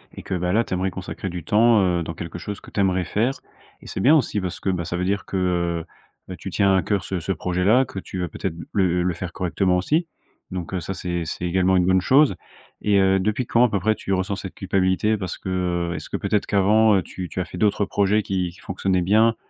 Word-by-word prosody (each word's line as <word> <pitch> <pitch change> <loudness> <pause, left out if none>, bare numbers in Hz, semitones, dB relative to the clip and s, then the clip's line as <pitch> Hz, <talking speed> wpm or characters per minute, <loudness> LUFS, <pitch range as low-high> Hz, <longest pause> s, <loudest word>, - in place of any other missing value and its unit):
Et - - -9
que, 95 - -5
bah, 90 0 0
là, 115 +2 +3
tu - - -6
aimerais 95 +1 0
consacrer 95 0 -6
du 85 -2 -6
temps, 110 0 +4
heu, 90 -2 +1
dans 85 - -5
quelque 85 0 -7
chose 105 +4 -6
que - - -15
tu - - -3
aimerais 95 -2 +2
faire. 115 +8 0 0.5
Et - - -13
c'est - - -5
bien 145 +10 +6
aussi, 110 -7 +1
parce 90 -2 -4
que, 95 - -2
bah, 85 -2 -2
ça 85 +1 -3
veut 90 - -1
dire 100 +1 -1
que, 95 - -3
heu, 85 -2 0 0.4
bah, 95 - -6
que, - - -20
tu 95 - -5
tiens 100 0 +3
à 95 - +3
cœur 100 +2 -1
ce 95 -2 -3
ce 90 +4 -3
projet 90 -1 -1
là, 125 +7 +5
que 95 - -7
tu 95 - -7
veux 90 - -1
peut-être 90 -4 -4 0.2
le 90 -3 +2
le 90 -1 0
faire 85 +1 -6
correctement, 90 0 +1
aussi. 155 - +1 0.4
Donc, 90 0 -5
heu, 90 - 0
ça, 95 +3 -4
c'est 85 -1 -3
c'est 90 - -4
également 95 +1 +2
une 90 - +3
bonne 95 0 +3
chose. 140 +7 +4 0.5
Et 105 -1 +3
heu, 95 0 +4
depuis 110 +5 0
quand, 120 +1 +3
à - - +1
peu 100 - 0
près, 110 +4 +2
tu - - -6
ressens 95 +2 0
cette 95 0 -7
culpabilité? 95 +3 +1
Parce 95 -3 -5
que, - - -7 0.4
heu, - - -3
est-ce - - -7
que, - - -2
peut-être, 105 - 0
qu'avant, 105 +2 +4
heu, 95 - +2
tu 90 -2 -7
tu - - -5
as 90 - -1
fait 90 - -9
d'autres 105 -1 +2
projets 100 +1 +1
qui 90 -2 -1
qui 85 - -18
fonctionnaient 95 -1 -1
bien, 110 +4 +4
95 Hz, 265 wpm, -23 LUFS, 90-105 Hz, 0.5 s, bien